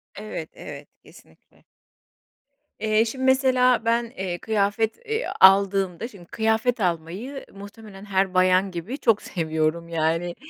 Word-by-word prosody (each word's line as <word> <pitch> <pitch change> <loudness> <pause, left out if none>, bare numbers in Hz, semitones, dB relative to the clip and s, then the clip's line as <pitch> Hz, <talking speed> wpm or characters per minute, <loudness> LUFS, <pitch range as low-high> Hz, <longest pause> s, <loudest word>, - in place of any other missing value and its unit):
Evet, 205 -6 -7
evet, - - -10 0.2
kesinlikle. - - -21 1.2
Eee, 215 +1 +2
şimdi 260 +3 -4
mesela 255 -3 +3
ben, 235 +1 +2
eee, 180 -2 -3
kıyafet, 220 +1 0
eee, 445 +2 -2
aldığımda, 195 +1 +4
şimdi 195 -8 -15
kıyafet 220 +4 0
almayı 185 - -3
muhtemelen 200 0 -12
her 190 -1 0
bayan 185 +1 +3
gibi 180 - -5
çok 225 -6 +2
seviyorum 160 0 -2
yani. 165 +2 -1
200 Hz, 120 wpm, -24 LUFS, 175-230 Hz, 1.2 s, aldığımda